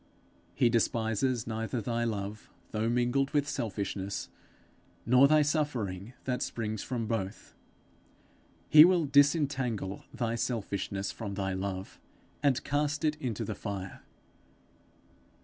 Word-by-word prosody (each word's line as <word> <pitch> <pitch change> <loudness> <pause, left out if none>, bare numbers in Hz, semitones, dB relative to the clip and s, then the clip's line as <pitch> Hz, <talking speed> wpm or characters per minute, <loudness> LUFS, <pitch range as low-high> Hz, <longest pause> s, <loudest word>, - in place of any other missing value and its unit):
He - - +4
despises 115 +1 +1
neither 115 +1 -3
thy 120 +2 -1
love 105 -1 -4 0.2
though 110 +1 0
mingled 125 +3 +1
with 145 -1 +2
selfishness, 100 -7 -3 0.8
nor 125 +4 +6
thy 155 +1 +5
suffering 125 - -2
that 125 -1 -2
springs 110 -2 -3
from 120 -3 -3
both; 105 -4 -4 1.1
he 155 0 +10
will 175 -2 +4
disentangle 140 - +2
thy 120 -4 -2
selfishness 100 -4 -2
from 100 -3 -6
thy 95 -1 -1
love, 95 0 -4 0.4
and 140 -3 +2
cast 145 +1 0
it 155 0 +2
into 120 -8 -3
the - - -3
fire. 95 -3 -6
115 Hz, 115 wpm, -30 LUFS, 100-135 Hz, 1.1 s, he